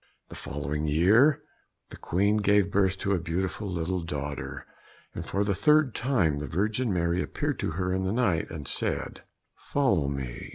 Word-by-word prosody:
The -, -, -9 dB
following 75 Hz, +2 st, -4 dB
year 105 Hz, -, +4 dB, 0.5 s
the -, -, -8 dB
Queen 100 Hz, +4 st, +1 dB
gave 105 Hz, -2 st, +3 dB
birth 95 Hz, -1 st, +2 dB
to 100 Hz, -, 0 dB
a 95 Hz, -, +2 dB
beautiful 95 Hz, +4 st, -3 dB
little 90 Hz, +1 st, -2 dB
daughter, 75 Hz, -4 st, -5 dB, 0.5 s
and -, -, -5 dB
for 100 Hz, +2 st, -1 dB
the 100 Hz, -1 st, 0 dB
third 150 Hz, +3 st, +3 dB
time 105 Hz, -, +1 dB
the 75 Hz, -, -5 dB
Virgin 105 Hz, -, 0 dB
Mary 85 Hz, 0 st, +1 dB
appeared -, -, -3 dB
to -, -, -1 dB
her 90 Hz, +1 st, -1 dB
in 95 Hz, -, 0 dB
the 95 Hz, -, -1 dB
night 100 Hz, -8 st, +1 dB
and 75 Hz, -4 st, -7 dB
said, -, -, -2 dB, 0.3 s
"Follow 100 Hz, -, +1 dB
me." 65 Hz, -3 st, -5 dB
95 Hz, 170 wpm, -27 LUFS, 80-105 Hz, 0.5 s, year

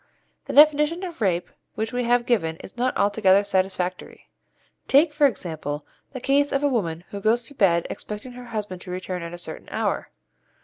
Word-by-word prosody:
The -, -, -5 dB
definition 300 Hz, +4 st, +5 dB
of 340 Hz, -8 st, -7 dB
rape 180 Hz, -4 st, +1 dB, 0.3 s
which 220 Hz, +2 st, -3 dB
we 245 Hz, 0 st, -1 dB
have 240 Hz, 0 st, +2 dB
given 170 Hz, -11 st, +1 dB
is -, -, -12 dB
not 250 Hz, +1 st, 0 dB
altogether 200 Hz, -1 st, +4 dB
satisfactory. 185 Hz, -2 st, -2 dB, 0.6 s
Take, 295 Hz, +3 st, +5 dB
for 295 Hz, -1 st, +5 dB
example, 155 Hz, -, -5 dB, 0.3 s
the 260 Hz, -, -6 dB
case 280 Hz, +3 st, +2 dB
of 275 Hz, +1 st, 0 dB
a -, -, +4 dB
woman 175 Hz, -11 st, -1 dB
who 200 Hz, -, -6 dB
goes 230 Hz, +4 st, +2 dB
to 260 Hz, -, -9 dB
bed 180 Hz, -9 st, +3 dB
expecting 210 Hz, +4 st, -7 dB
her 245 Hz, 0 st, -10 dB
husband 210 Hz, -6 st, -5 dB
to 185 Hz, -, -10 dB
return 180 Hz, 0 st, -4 dB
at 170 Hz, 0 st, -6 dB
a 175 Hz, -, -7 dB
certain 165 Hz, -2 st, -7 dB
hour. -, -, -2 dB
215 Hz, 185 wpm, -24 LUFS, 180-255 Hz, 0.6 s, definition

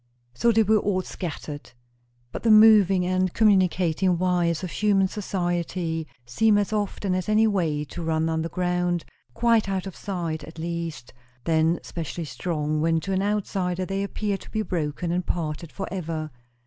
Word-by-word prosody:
So 235 Hz, -, +3 dB
they 225 Hz, 0 st, +4 dB
were 215 Hz, +1 st, +3 dB
all 185 Hz, -3 st, 0 dB
scattered. 150 Hz, -7 st, -7 dB, 0.6 s
But -, -, -5 dB
the 230 Hz, -, +1 dB
moving 210 Hz, -4 st, +7 dB
and 185 Hz, 0 st, +1 dB
communicating 185 Hz, -4 st, +3 dB
wires 175 Hz, -1 st, +1 dB
of 180 Hz, -, -4 dB
human 200 Hz, -2 st, +2 dB
society 175 Hz, -4 st, -2 dB, 0.2 s
seem 205 Hz, -, +3 dB
as 205 Hz, +1 st, 0 dB
often 205 Hz, -2 st, -1 dB
as 185 Hz, +1 st, -2 dB
any 215 Hz, +1 st, +4 dB
way 165 Hz, -8 st, 0 dB
to 160 Hz, +5 st, -8 dB
run 160 Hz, -1 st, 0 dB
underground; 175 Hz, +2 st, -1 dB, 0.3 s
quite 230 Hz, -4 st, +3 dB
out 190 Hz, -1 st, -2 dB
of 190 Hz, -, -7 dB
sight, 170 Hz, -6 st, -4 dB
at 160 Hz, -, -11 dB
least; 165 Hz, -6 st, -5 dB, 0.3 s
then 160 Hz, +1 st, +2 dB
specially 165 Hz, 0 st, -5 dB
strong, 155 Hz, -1 st, -2 dB
when 165 Hz, 0 st, +2 dB
to 195 Hz, -, -3 dB
an 190 Hz, -, +1 dB
outsider 190 Hz, -3 st, -1 dB
they 195 Hz, +1 st, -2 dB
appear 200 Hz, 0 st, -2 dB
to -, -, -14 dB
be 220 Hz, -1 st, -1 dB
broken 170 Hz, -2 st, -2 dB
and 180 Hz, 0 st, -1 dB
parted 160 Hz, -1 st, -3 dB
for 195 Hz, -, -5 dB
ever. 160 Hz, -4 st, -4 dB
180 Hz, 160 wpm, -25 LUFS, 165-195 Hz, 0.6 s, moving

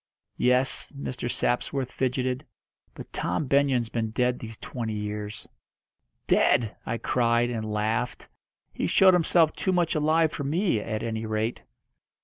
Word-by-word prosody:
"Yes." 125 Hz, +1 st, +2 dB
Mr. 125 Hz, -3 st, -4 dB
Sapsworth 125 Hz, +2 st, -1 dB
fidgeted. 130 Hz, +1 st, -1 dB, 0.5 s
"But -, -, -10 dB
Tom 90 Hz, -, -1 dB
Benyon's 135 Hz, -4 st, +2 dB
been 115 Hz, -1 st, -2 dB
dead 125 Hz, +2 st, 0 dB
these 110 Hz, -1 st, -8 dB
twenty 115 Hz, -4 st, -4 dB
years." 105 Hz, +1 st, -5 dB, 0.8 s
"Dead!" 115 Hz, -3 st, +3 dB
I 115 Hz, -, -1 dB
cried, 120 Hz, 0 st, +1 dB
and 110 Hz, -2 st, -3 dB
laughed. 110 Hz, +4 st, -1 dB, 0.5 s
"He -, -, -1 dB
showed 190 Hz, -1 st, +6 dB
himself 165 Hz, -2 st, +4 dB
too 190 Hz, -, -1 dB
much 175 Hz, -3 st, +2 dB
alive 155 Hz, +1 st, +2 dB
for 145 Hz, -, -4 dB
me, 160 Hz, -, +1 dB
at 110 Hz, +1 st, -4 dB
any 110 Hz, -1 st, -3 dB
rate." 110 Hz, +2 st, -2 dB
125 Hz, 135 wpm, -26 LUFS, 110-140 Hz, 0.8 s, showed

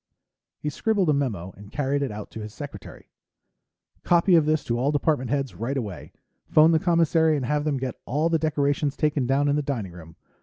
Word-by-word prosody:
He 150 Hz, -, -4 dB
scribbled 200 Hz, -1 st, +1 dB
a -, -, +4 dB
memo 105 Hz, -11 st, -2 dB
and 100 Hz, +1 st, -14 dB
carried 140 Hz, -1 st, -1 dB
it 140 Hz, -, -2 dB
out 105 Hz, 0 st, -8 dB
to -, -, -8 dB
his 105 Hz, 0 st, -8 dB
secretary. -, -, -10 dB, 0.9 s
"Copy 175 Hz, +2 st, +3 dB
of 160 Hz, -3 st, +5 dB
this 155 Hz, -1 st, +1 dB
to 120 Hz, 0 st, -2 dB
all 135 Hz, +4 st, +1 dB
department 145 Hz, -4 st, 0 dB
heads, 135 Hz, -4 st, -1 dB
right 115 Hz, +10 st, -3 dB
away. 100 Hz, -, -6 dB, 0.4 s
Phone 155 Hz, +1 st, +5 dB
the 160 Hz, -, +3 dB
commissary 165 Hz, -2 st, +3 dB
and 135 Hz, -, -3 dB
have 150 Hz, +2 st, 0 dB
them 150 Hz, -3 st, 0 dB
get 130 Hz, -2 st, -5 dB
all 150 Hz, +6 st, +1 dB
the 165 Hz, -1 st, +1 dB
decorations 145 Hz, -2 st, 0 dB
taken 150 Hz, -4 st, 0 dB
down 140 Hz, +2 st, +2 dB
in 145 Hz, +1 st, +2 dB
the -, -, +1 dB
dining 120 Hz, -10 st, -3 dB
room. 80 Hz, -2 st, -13 dB
140 Hz, 205 wpm, -25 LUFS, 120-155 Hz, 0.9 s, of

